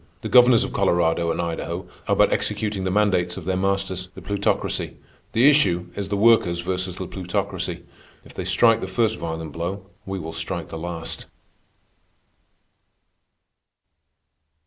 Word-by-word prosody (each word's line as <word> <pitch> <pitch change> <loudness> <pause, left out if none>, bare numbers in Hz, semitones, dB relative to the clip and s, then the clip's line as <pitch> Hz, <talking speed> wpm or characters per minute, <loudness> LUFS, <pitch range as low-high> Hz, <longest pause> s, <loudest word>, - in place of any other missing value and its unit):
The - - -4
governors 125 -2 +7
of - - -5
Colorado 85 -1 +2
and 80 - -1
Idaho 85 +1 -3 0.2
are - - +3
but - - +4
executing 105 -3 -1
the - - +1
mandates 95 -3 +1
of 90 - -7
their 95 0 0
masters, 95 -1 -1
the - - -9
Plutocracy. 100 0 -1 0.4
The 120 +5 +5
issue 90 -12 +3
is 100 -1 -4
the 100 - 0
Workers 100 -6 +4
versus 90 0 -2
the 95 - -5
Plutocracy. 90 0 -3 0.4
If - - -14
they - - -4
strike 115 -1 +4
the - - -3
first 110 +3 0
violent 80 -1 -4
blow, 90 +5 -4 0.2
we 95 0 -3
will 80 -2 -6
strike 80 +1 -4
the 80 - -6
last. 85 -1 -6
95 Hz, 145 wpm, -23 LUFS, 85-100 Hz, 0.4 s, governors